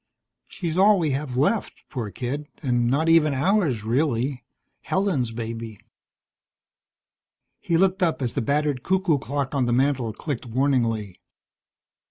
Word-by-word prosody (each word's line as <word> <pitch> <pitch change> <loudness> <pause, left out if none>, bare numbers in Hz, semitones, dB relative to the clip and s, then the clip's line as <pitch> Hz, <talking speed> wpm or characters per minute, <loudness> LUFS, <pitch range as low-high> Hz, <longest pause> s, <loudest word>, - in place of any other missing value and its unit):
She's 175 -2 -3
all 205 +1 +6
we 160 -5 0
have 135 -2 -3
left, 175 - 0
poor 120 -7 -4
kid, 130 +9 -4 0.2
and 120 -3 +1
not 145 +6 +1
even 160 -3 +4
ours, 155 - +1
really. 125 +1 0 0.4
Helen's 185 - 0
baby. 115 -1 -6 1.8
He 165 - 0
looked 190 +1 +2
up 170 -3 +1
as 125 -4 -2
the 135 - -1
battered 145 +1 0
cuckoo 185 -4 +1
clock 140 +1 -3
on 135 -3 +1
the 120 - +1
mantel 130 -2 +1
clicked 125 +2 -5
warningly. 115 -6 0
140 Hz, 135 wpm, -24 LUFS, 120-160 Hz, 1.8 s, all